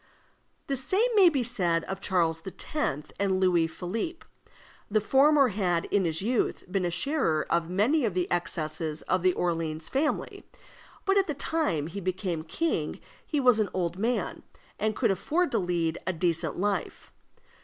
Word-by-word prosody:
The 275 - -2
same 390 - +2
may 390 -5 +7
be 275 -6 0
said 175 -8 +1
of 195 0 -5
Charles 165 -4 +1
X. 190 - -7 0.5
and 195 -2 +1
Louis 175 -3 +3
Philippe. 220 - -5 0.6
The 215 +1 +3
former 275 +4 +4
had, 180 -5 0
in 200 -2 +2
his 165 +2 -1
youth, 240 +2 0
been 190 -1 0
a - - +1
sharer 175 - +1
of 170 0 +1
many 230 - +2
of 210 -6 0
the 180 -1 +1
excesses 155 -2 -2
of 185 -1 0
the 185 0 +3
Orleans 165 -3 -2
family, 295 +3 -1 0.6
but 395 0 +4
at 390 - +1
the 300 - -2
time 285 - 0
he 175 +5 -6
became 185 -2 -2
king 315 - -2 0.2
he 300 - -1
was 250 -4 +5
an 210 -3 +1
old 175 0 -2
man, 235 +4 -1 0.4
and 215 0 0
could 230 -5 +2
afford 305 - 0
to - - +2
lead 175 -3 -1
a 185 - +1
decent 170 0 -1
life. 200 +2 -2
190 Hz, 165 wpm, -28 LUFS, 170-260 Hz, 0.6 s, may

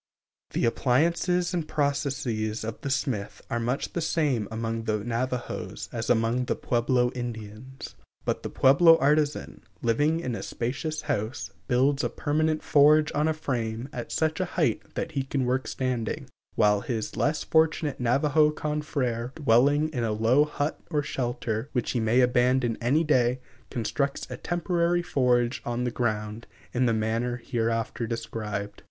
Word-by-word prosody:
The - - +1
appliances 170 +9 +1
and 170 -3 -1
processes 135 -8 -1
of 110 0 -5
the 140 - -3
smith 130 -6 -2
are 120 - 0
much 125 +4 -2
the 170 - -1
same 145 -10 0
among 115 0 -3
the 105 -2 -1
Navajos 120 +2 -3
as 115 -1 -4
among 120 +2 +2
the - - 0
Pueblo 125 +1 +1
Indians. 120 +1 -7 0.3
But - - -1
the - - -5
Pueblo 165 +5 +6
artisan, 150 +1 +1 0.2
living 145 +8 +2
in 130 -8 -3
a - - -4
spacious 145 +6 -3
house, 110 0 -3 0.2
builds 135 +3 +2
a - - +1
permanent 155 +1 0
forge 150 +1 +5
on 150 +1 +1
a 160 - +2
frame 120 -5 -3
at 120 -2 -6
such 160 +1 0
a 185 - +1
height 150 -11 +2
that 165 - -3
he 140 -3 -1
can 135 0 -1
work 130 +1 0
standing, 125 -4 -2 0.3
while 105 -1 +3
his 115 -2 -3
less 150 +1 0
fortunate 160 -2 +1
Navajo 145 +5 +3
confr├©re, 145 -6 -2
dwelling 145 +2 +3
in 125 -6 -2
a 110 - 0
low 115 +7 +4
hut 150 0 -3
or 150 -3 0
shelter, 120 -2 -3
which 125 -3 0
he 125 - 0
may 115 +3 +3
abandon 125 -1 +2
any 140 +7 +3
day, 130 -4 +2 0.3
constructs 135 +4 -2
a 125 - -4
temporary 175 +1 0
forge 125 -7 +1
on 120 +1 -2
the 125 - -1
ground 110 -2 -2 0.3
in 125 0 +2
the - - +3
manner 115 +3 0
hereafter 115 -1 -2
described. 105 -3 -4
125 Hz, 155 wpm, -27 LUFS, 115-150 Hz, 0.3 s, Pueblo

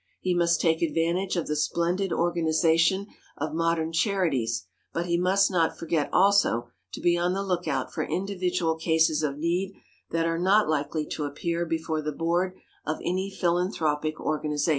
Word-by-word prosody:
He 185 - 0
must 170 -1 +2
take 160 -1 +2
advantage 170 +4 0
of 170 - -1
the 150 - -2
splendid 170 +5 0
organization 170 +2 +2 0.3
of 155 +2 -3
modern 165 0 0
charities, 160 - 0 0.3
but 170 - -2
he 170 -1 0
must 190 +3 +3
not 165 -3 +1
forget 165 -3 -1
also 190 -12 +3 0.2
to - - -5
be 175 0 +3
on 175 +1 +1
the 195 +1 -1
lookout 180 -2 -2
for - - -2
individual 180 -3 -1
cases 160 -1 +2
of 145 -2 -2
need 175 +5 -1 0.3
that 165 0 0
are 165 0 0
not 200 +4 +4
likely 150 0 -1
to 150 - -4
appear 170 +4 -2
before 160 -1 -2
the 150 0 -3
board 175 +4 0 0.3
of 155 +1 -2
any 185 +2 -1
philanthropic 170 -5 0
organization. 150 0 -1
170 Hz, 160 wpm, -26 LUFS, 155-180 Hz, 0.3 s, not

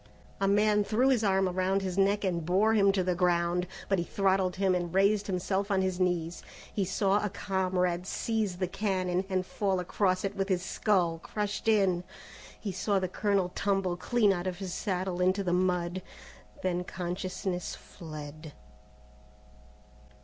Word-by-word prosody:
A 195 - +2
man 210 +1 +3
threw 235 +6 +2
his 245 -4 +2
arm 190 -1 +3
around 185 +2 0
his 185 -2 -2
neck 200 +1 +2
and 175 -4 0
bore 195 +7 +3
him 200 -2 +5
to 195 -1 0
the 180 0 +1
ground, 175 0 +1 0.2
but 195 -2 +1
he - - 0
throttled 190 0 +1
him 190 -1 +2
and 175 -1 -1
raised 200 +2 +3
himself 190 +2 -1
on 190 -2 +2
his 185 -1 -1
knees. 175 -2 0 0.3
He 200 - 0
saw 195 +2 +1
a 210 - 0
comrade 185 -2 -1
seize 215 -5 -1
the 185 0 -1
cannon, 185 -1 -1
and 185 -1 0
fall 195 -1 -1
across 185 +1 0
it 195 +1 -3
with 195 0 -2
his 180 -2 +1
skull 180 -5 +1
crushed 205 +4 -4
in; 195 -5 +3 0.6
he 205 - -4
saw 195 +2 0
the 185 -1 0
colonel 195 -1 0
tumble 195 -3 0
clean 210 +2 +2
out 175 0 -3
of 180 -1 -3
his 190 -2 -5
saddle 185 -2 -2
into 185 +2 +2
the 175 -2 0
mud; 180 0 0 0.6
then 180 -1 0
consciousness 180 +1 -4
fled. 155 -1 -9
185 Hz, 165 wpm, -29 LUFS, 180-200 Hz, 0.6 s, him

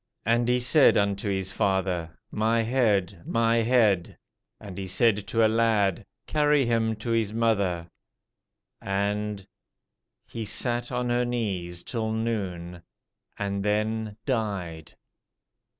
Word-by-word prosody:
And 120 +2 +2
he 125 0 +2
said 135 +4 +5
unto 100 0 0
his 95 -1 -2
father, 95 -4 -1
My 115 +2 +1
head, 105 -7 +1
my 115 +2 +1
head. 110 -6 +2 0.4
And 100 -3 -9
he 95 0 -5
said 105 +1 +2
to 115 -1 +3
a - - +6
lad, 110 -4 +1 0.2
Carry 150 -2 +2
him 115 -1 +1
to 110 +2 -5
his 115 -3 +1
mother. 100 -7 0 0.9
And... 100 0 -2 0.8
he 115 - -6
sat 120 +3 0
on 125 -1 -1
her 120 +1 +2
knees 95 -8 -3
till 110 -2 -3
noon, 95 -7 -3 0.6
and 100 -1 -2
then 110 +1 -1
died. 100 - -3
110 Hz, 120 wpm, -26 LUFS, 95-115 Hz, 0.9 s, a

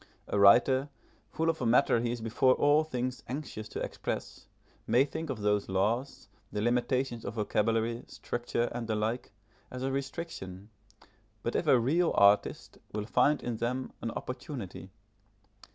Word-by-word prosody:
A 100 - 0
writer, 130 +7 +6 0.4
full 160 - -1
of 165 -3 0
a - - 0
matter 115 0 +4
he 120 0 -1
is 120 -1 -4
before 120 +3 +3
all 145 +2 +4
things 125 -5 -3
anxious 125 -5 -6
to - - -5
express, - - -5 0.4
may 130 +3 +4
think 160 +2 -5
of 125 -6 -4
those 105 -1 +1
laws, 105 +7 -1 0.2
the 105 - -3
limitations 120 +1 0
of - - -5
vocabulary, 115 +2 0
structure, 120 -1 -3
and 120 -1 -4
the 110 - 0
like, 110 +2 -2 0.4
as 125 0 -6
a 135 - 0
restriction, 135 - -5 0.7
but 120 - -2
if 160 - 0
a 135 - +7
real 160 +8 +2
artist 100 +1 +3
will 105 0 -2
find 145 +6 +2
in 120 -2 -2
them 125 +3 -2
an 115 - -2
opportunity. 115 - -6
120 Hz, 155 wpm, -30 LUFS, 110-135 Hz, 0.7 s, a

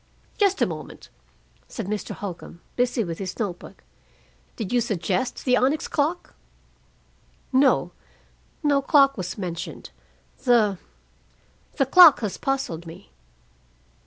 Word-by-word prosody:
"Just 395 -2 +2
a - - +4
moment," - - -8 0.6
said 225 - -6
Mr. 210 +2 -4
Holcombe, 180 -3 -8 0.2
busy 245 -1 0
with 165 -3 -6
his 190 -2 -5
note 195 -6 -3
book. - - -14 0.7
"Did 220 -1 -5
you 245 - +3
suggest 195 +1 -2
the 250 -2 +4
onyx 270 +5 +1
clock?" 315 +5 -2 1.2
"No. 265 +1 +3 0.7
No 285 -2 +3
clock 275 -1 +4
was 180 -3 -5
mentioned. 175 -4 -6 0.5
The 220 -7 +3 1.0
the 270 - +2
clock 330 +1 +8
has 210 -4 -3
puzzled 175 -12 -3
me." 160 - -12
235 Hz, 120 wpm, -24 LUFS, 185-275 Hz, 1.2 s, clock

